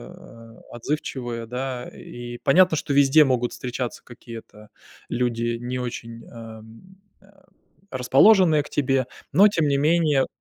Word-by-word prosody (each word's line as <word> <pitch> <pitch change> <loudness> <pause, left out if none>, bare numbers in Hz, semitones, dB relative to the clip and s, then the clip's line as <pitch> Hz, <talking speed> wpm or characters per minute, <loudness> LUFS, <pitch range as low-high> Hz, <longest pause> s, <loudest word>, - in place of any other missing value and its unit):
э, 115 -1 -15
отзывчивые, 120 -2 -4
да. 125 +1 -5
И 120 0 -9
понятно, 175 +3 +4
что 145 - -3
везде 140 +2 +6
могут 125 -3 0
встречаться 125 -1 -5
какие-то 115 -3 -12 0.4
люди, 120 -1 -1
не 125 +1 -4
очень, 115 -1 -7
эм, 115 - -13 0.2
э, - - -22 0.6
расположенные 155 - +4
к - - -13
тебе, 135 -2 0 0.2
но 195 +8 +6
тем 165 -7 0
не 140 - +1
менее 150 -2 +2
125 Hz, 125 wpm, -23 LUFS, 120-145 Hz, 0.6 s, везде